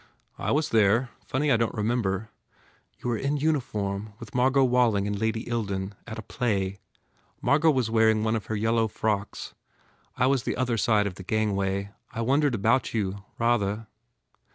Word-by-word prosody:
"I - - -2
was 155 +1 +1
there. 110 +3 +3 0.2
Funny 145 +2 +1
I 115 - +5
don 115 0 +1
t - - -9
remember 110 -1 -1 0.3
" - - -35
"You 125 - -1
were 115 - 0
in 140 +5 -1
uniform 110 -9 -1
with - - -10
Margot 130 +2 +3
Walling 120 -5 +3
and 105 -1 -2
Lady 110 +1 -1
Ilden. 100 -4 -2
At 110 - -6
a 110 - -6
play. 100 -5 -1 0.6
Margot 155 +3 +3
was 130 -6 +1
wear 110 -1 +5
ing 110 -1 +2
one 110 +1 +1
of 110 - -4
her 110 - -2
yellow 110 +1 +2
frocks. 105 -2 -2 0.6
I 125 - +3
was 135 -1 +3
the - - -3
other 125 -2 +1
side 110 -2 +2
of 95 -2 -4
the - - -8
gangway. 100 -1 -1 0.2
I 115 - -4
wondered 135 +2 +2
about 115 +5 +1
you, 100 -2 -2
rather. 115 -2 +1
110 Hz, 180 wpm, -26 LUFS, 100-125 Hz, 0.6 s, I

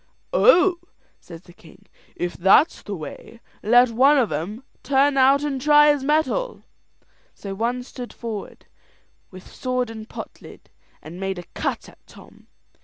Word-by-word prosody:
"Oh!" 365 -6 +4 0.4
says 165 0 -13
the 175 - -17
king, 170 - -19 0.3
"if 175 0 -3
that's 195 - +3
the 205 - -6
way, 180 +7 -10 0.2
let 245 +3 +4
one 270 +6 +4
of 240 - +1
'em 185 - -5 0.2
turn 280 +1 +2
out 275 +2 +4
and 275 -3 -3
try 295 +1 +6
his 285 -2 -5
mettle." 315 - -1 0.7
So 195 -1 -7
one 235 +5 -2
stood 245 -1 -9
forward, 225 -4 -8 0.6
with 185 -1 -13
sword 255 -2 -2
and 220 0 -10
pot - - -9
lid, - - -15 0.3
and 170 +4 -10
made 195 -1 -3
a 175 - -7
cut - - -3
at - - -17
Tom. - - -18
245 Hz, 155 wpm, -22 LUFS, 195-280 Hz, 0.7 s, try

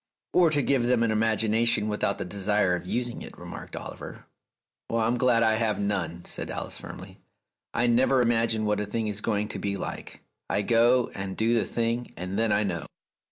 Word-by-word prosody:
"Or 175 -2 +5
to 145 -2 +1
give 130 -4 +2
them 125 -2 +3
an 115 - +2
imagination 110 0 +2
without 105 -1 0
the - - -4
desire 100 0 +1
of 90 0 -3
using 120 +3 -2
it," - - -10
remarked - - -8
Oliver. - - -8 0.6
"I'm 115 +1 +1
glad 120 -2 +4
I 110 -1 +3
have 110 -3 0
none," 90 -4 -2
said - - -4
Alice - - -4
firmly. - - -10 0.6
"I 120 - +2
never 125 +2 +4
imagine 115 -2 +2
what 105 -1 +1
a 105 - -2
thing 110 +2 -2
is 105 -1 -2
going 105 -1 0
to - - -4
be 100 -1 -2
like. - - -7 0.3
I 105 - +1
go 120 +2 +3
and 95 -1 -5
do 115 +1 +2
the 115 - +2
thing, 115 +1 -2
and 90 +4 -3
then 115 -1 +2
I 105 +1 +3
know." 85 -7 -3
110 Hz, 195 wpm, -27 LUFS, 100-120 Hz, 0.6 s, Or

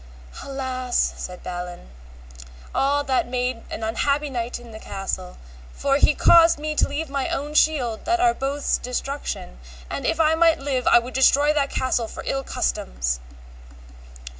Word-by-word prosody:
Alas, 260 -2 -3 0.2
said 180 -1 -7
Balin, 175 - -7 0.8
all 285 +1 +2
that 265 -3 0
made 250 -1 -2
an 225 - -5
unhappy 280 +6 0
knight 240 -1 -3
in 240 -1 -13
the 220 - -9
castle, 195 - -5 0.4
for 275 0 +1
he 295 - +4
caused 335 -1 +6
me 305 +1 -3
to - - +2
leave 300 +3 -3
my 275 -1 -2
own 295 +2 -3
shield 265 -8 +2
to 350 +1 +2
our 360 0 +4
both's 280 0 -1
destruction, 250 - -5 0.3
and - - -3
if 325 - 0
I 315 0 +4
might 330 0 +4
live 270 -3 -2
I - - +7
would 240 +2 -2
destroy 285 +3 +4
that 280 -2 +1
castle 250 -3 0
for - - -8
ill 270 0 -1
customs. - - -2
270 Hz, 160 wpm, -23 LUFS, 235-290 Hz, 0.8 s, I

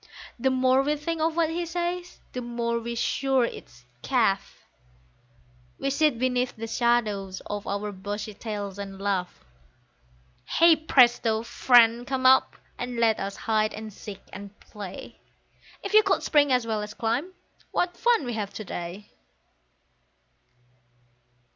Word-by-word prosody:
The 265 - +2
more 260 0 +3
we 295 +2 0
think 315 +2 -3
of 320 0 +1
what 330 -1 +1
he 345 +2 -2
says, 350 +1 -4
the 250 - -3
more 235 -1 -2
we're 235 +1 -5
sure 265 +1 +1
it's 125 - -10 0.2
"chaff," 220 - 0 1.1
We 275 - -1
sit 300 -3 +2
beneath 250 0 0
the 225 - -6
shadow 225 -4 +1 0.2
of 205 0 -5
our 205 +1 -2
bushy 205 +2 -5
tails 205 -2 -6
and 195 -1 -7
laugh; 195 -3 -2 1.1
Hey, 335 0 +7
presto! 240 -7 +3
Friend, 240 0 +4
come 265 -1 -2
up, 260 +1 +5 0.2
and 245 0 -4
let 225 -2 +3
us 195 0 -4
hide 215 0 0
and 215 -1 -8
seek 200 0 -10
and 200 +2 -10
play, 205 -4 -10 0.6
If - - -5
you 430 - +9
could 395 -2 +1
spring 290 -2 +3
as 250 -2 +2
well 220 -2 -1
as 210 0 -7
climb, 250 +11 -1 0.4
what 355 0 -1
fun 475 - +2
we'd 240 - -3
have 205 -2 -4
to 215 - -6
day! 175 +3 -6
235 Hz, 145 wpm, -26 LUFS, 210-275 Hz, 1.1 s, you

